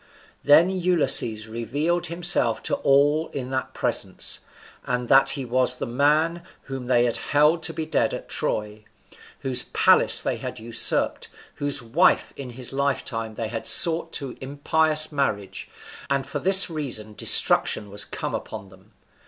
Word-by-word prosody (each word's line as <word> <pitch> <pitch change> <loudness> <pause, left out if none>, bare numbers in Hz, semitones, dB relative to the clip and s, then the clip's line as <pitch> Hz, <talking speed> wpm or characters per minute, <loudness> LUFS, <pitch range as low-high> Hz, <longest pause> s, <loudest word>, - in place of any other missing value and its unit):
Then 160 +6 +5
Ulysses 170 - +1
revealed 145 +11 -3
himself 170 - +2
to - - 0
all 145 +3 +2
in 130 -1 -6
that 130 0 -4
presence, - - -1 0.4
and 125 -1 -3
that 135 0 +4
he 135 - -5
was 125 +1 0
the - - -5
man 150 +7 0 0.2
whom 135 -2 -8
they 120 -1 +2
held 150 +7 +1
to 165 - -2
be 160 0 -5
dead 160 - -1
at - - -7
Troy, 105 0 -3 0.6
whose 130 -2 -1
palace - - +3
they - - -2
had - - -7
usurped, 115 +1 -1 0.3
whose 145 -3 -1
wife 135 +11 +1
in 135 -2 -8
his 125 +1 -5
lifetime 125 -5 -3
they 110 -1 -5
had 115 - -5
sought 165 0 +3
in 130 -3 -9
impious 155 +3 +1
marriage, 100 -10 -4 0.4
and 140 -1 -1
that - - -15
for - - -4
this 195 +1 +5
reason 130 -10 -3
destruction 105 0 +4
was 100 0 -2
come - - -6
upon 100 -3 -7
them. 95 +3 -21
135 Hz, 155 wpm, -23 LUFS, 115-155 Hz, 0.6 s, Then